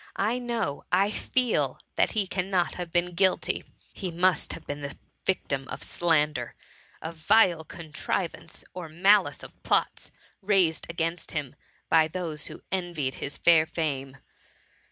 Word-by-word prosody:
I 225 +5 +1
know, 235 - -2
I 195 +3 +3
feel, 250 +2 +1 0.2
that - - +2
he 210 -3 +1
cannot 185 -1 0
have 175 -2 -6
been 175 +1 +1
guilty! 185 +1 +1 0.3
He 190 - -4
must 175 +1 +2
have - - -9
been 145 0 -5
the 140 -1 -6 0.3
victiAi 140 -8 0
of - - -6
slander; 150 -7 +1 0.5
of 165 +1 -6
vile 175 -1 +4
contrivance 160 +2 -4
or 180 -3 -6
malice 195 +5 +3
of - - -13
plots - - 0 0.3
raised 190 -5 +2
against 170 0 -2
him 145 -5 -3 0.3
by 160 -1 +5
those 160 -3 -4
who - - -10
envied 175 -8 -1
his 140 0 -5
fair 160 -2 +5
fame. 135 -5 -3
170 Hz, 140 wpm, -27 LUFS, 155-190 Hz, 0.5 s, by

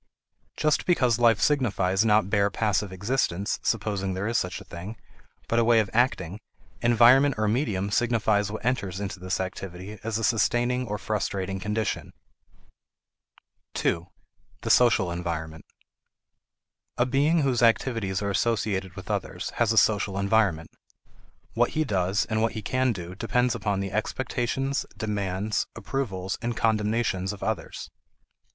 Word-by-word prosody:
Just 155 -1 +1
because 125 -10 +3
life 115 -3 +4
signifies 105 -9 +2
not 105 -3 +3
bare 100 0 +2
passive 105 -2 0
existence 100 -1 -1
(supposing 95 -3 -1
there 95 +3 -2
is 115 - -2
such 90 -5 -1
a - - -11
thing), 95 +6 -8 0.5
but 115 - +2
a - - +4
way 115 0 +5
of 105 -3 -1
acting, 105 -6 +1 0.4
environment 120 +4 +5
or 105 0 +1
medium 105 -4 0
signifies 110 -3 +1
what 110 - -6
enters 100 -7 -1
into 100 -2 -5
this 90 +1 -2
activity 95 +2 -6
as 110 -1 -2
a 115 - -3
sustaining 120 +3 +1
or 105 0 -3
frustrating 95 -3 -2
condition. 105 +1 -2 1.6
2. 85 +1 0 0.5
The - - 0
Social 110 -7 +4
Environment. 80 -2 -4 1.3
A 120 - +3
being 145 +6 +2
whose 130 -3 +1
activities 115 -4 +1
are 100 - -1
associated 100 -4 -1
with - - -6
others - - -3
has 115 -2 +3
a 110 - 0
social 100 -2 +3
environment. 100 -5 +1 0.8
What - - +1
he 155 - +3
does 95 -5 0
and 110 -1 -1
what 115 - +1
he 110 -1 -5
can 130 +3 +1
do 90 -4 -6
depend 120 +4 0
upon 105 -4 -1
the 95 -1 -4
expectations, 130 +5 -1
demands, 105 -2 -2
approvals, 95 -8 -3
and 120 -1 -3
condemnations 105 -3 0
of 100 - -8
others. - - -4
105 Hz, 145 wpm, -26 LUFS, 95-120 Hz, 1.6 s, way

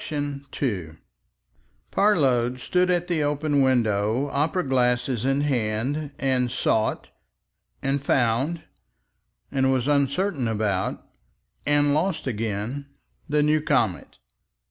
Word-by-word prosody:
§ 145 -2 -4
2 90 - -3 0.9
Parload 130 - +2
stood 180 +7 +1
at 175 -1 +1
the 170 -3 0
open 145 0 +1
window, 120 0 +1
opera 155 +6 0
glass 125 -2 +2
in 135 +2 0
hand, 135 +2 -1
and 130 -2 +1
sought 110 -2 0 0.7
and 135 0 0
found 135 +6 +1 0.9
and 130 -1 +2
was 130 0 0
uncertain 140 +1 +1
about 105 -4 -1 0.6
and 145 0 +3
lost 165 +4 0
again, 115 +3 -3 0.4
the 150 0 +2
new 155 +1 +3
comet. 125 - 0
135 Hz, 105 wpm, -24 LUFS, 120-145 Hz, 0.9 s, and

